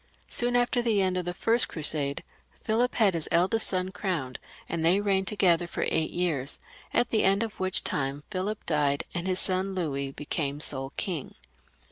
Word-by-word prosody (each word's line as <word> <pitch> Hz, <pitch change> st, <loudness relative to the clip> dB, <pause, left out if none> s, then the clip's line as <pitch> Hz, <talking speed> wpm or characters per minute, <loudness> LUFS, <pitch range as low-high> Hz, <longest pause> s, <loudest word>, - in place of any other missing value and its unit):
Soon 245 Hz, 0 st, +1 dB
after 245 Hz, 0 st, +2 dB
the 225 Hz, -4 st, +1 dB
end 185 Hz, -1 st, +1 dB
of 180 Hz, -1 st, -2 dB
the 175 Hz, -, -3 dB
first 230 Hz, +4 st, +2 dB
Crusade 145 Hz, -3 st, +1 dB, 0.4 s
Philip 235 Hz, +3 st, +1 dB
had 210 Hz, -5 st, +3 dB
his 165 Hz, -2 st, -2 dB
eldest 190 Hz, +6 st, +2 dB
son 185 Hz, 0 st, -1 dB
crowned, 165 Hz, -11 st, -3 dB, 0.3 s
and 165 Hz, -1 st, -3 dB
they 175 Hz, +4 st, +4 dB
reigned 195 Hz, -2 st, 0 dB
to 210 Hz, -, -2 dB
gether 175 Hz, -3 st, +3 dB
for -, -, -3 dB
eight 160 Hz, -1 st, +1 dB
years, 155 Hz, -6 st, -1 dB, 0.3 s
at 240 Hz, -, +1 dB
the 220 Hz, -, +2 dB
end 195 Hz, +3 st, +3 dB
of 225 Hz, -2 st, -7 dB
which 185 Hz, 0 st, +2 dB
time 140 Hz, +1 st, -2 dB
Philip 205 Hz, +3 st, -3 dB
died, 145 Hz, -2 st, +1 dB
and 175 Hz, +1 st, -3 dB
his 185 Hz, 0 st, +1 dB
son 190 Hz, 0 st, +5 dB
Louis 140 Hz, -6 st, -2 dB
became 145 Hz, 0 st, -3 dB
sole 135 Hz, -3 st, -2 dB
king. 175 Hz, -9 st, -4 dB
180 Hz, 185 wpm, -27 LUFS, 150-200 Hz, 0.4 s, son